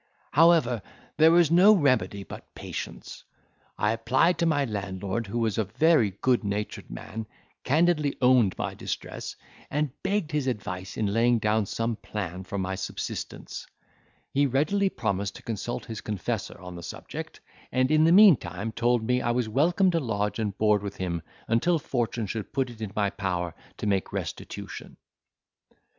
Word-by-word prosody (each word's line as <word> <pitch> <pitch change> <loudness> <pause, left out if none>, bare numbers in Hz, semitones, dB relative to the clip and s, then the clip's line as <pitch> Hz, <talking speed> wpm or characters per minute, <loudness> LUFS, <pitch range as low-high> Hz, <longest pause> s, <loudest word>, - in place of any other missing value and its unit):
However, 150 -8 +4 0.4
there 160 +1 +7
was 170 -2 +5
no 190 +5 +7
remedy 130 - +1
but - - -11
patience: - - -7 0.5
I 105 - +2
applied 130 +9 +2
to 170 - +3
my 145 -3 +2
landlord, 100 0 -3
who 100 - -4
was 110 -3 0
a - - +3
very 140 - +3
good 125 -2 +3
natured 100 +1 -3
man, 110 - -7 0.4
candidly 150 0 +2
owned 125 -6 +4
my - - -2
distress, - - -5 0.3
and 150 -1 0
begged 195 -4 -1
his 150 -3 0
advice 95 -6 -4
in 110 - 0
laying 120 +2 +4
down 105 -1 +1
some 115 +1 -2
plan 95 -5 -5
for 100 - -5
my 95 0 -2
subsistence; 95 0 -5 0.7
he 140 +1 +3
readily 155 +10 +2
promised 100 - -2
to - - -11
consult 115 +2 -4
his 110 -3 -6
confessor 105 -4 -3
on 90 0 -9
this 85 -2 -7
subject, - - -7 0.3
and, 130 +2 +2
in 155 0 +5
the 165 - +5
meantime, 175 - +5
told 120 +1 +1
me, 125 +2 +1
I 120 - -1
was 120 -1 +1
welcome 170 - +3
to 170 - +1
lodge 105 -5 -2
and 105 -3 -2
board 105 -1 +3
with 100 -1 -6
him 85 -3 -2 0.3
until 140 +10 +2
fortune 120 -6 -2
should 105 +4 -5
put 135 -3 0
it 115 -2 -13
in 105 -3 -4
my 100 -2 +1
power 90 -4 -2 0.2
to - - -5
make 100 -2 0
restitution. - - -6
115 Hz, 165 wpm, -27 LUFS, 100-145 Hz, 0.7 s, there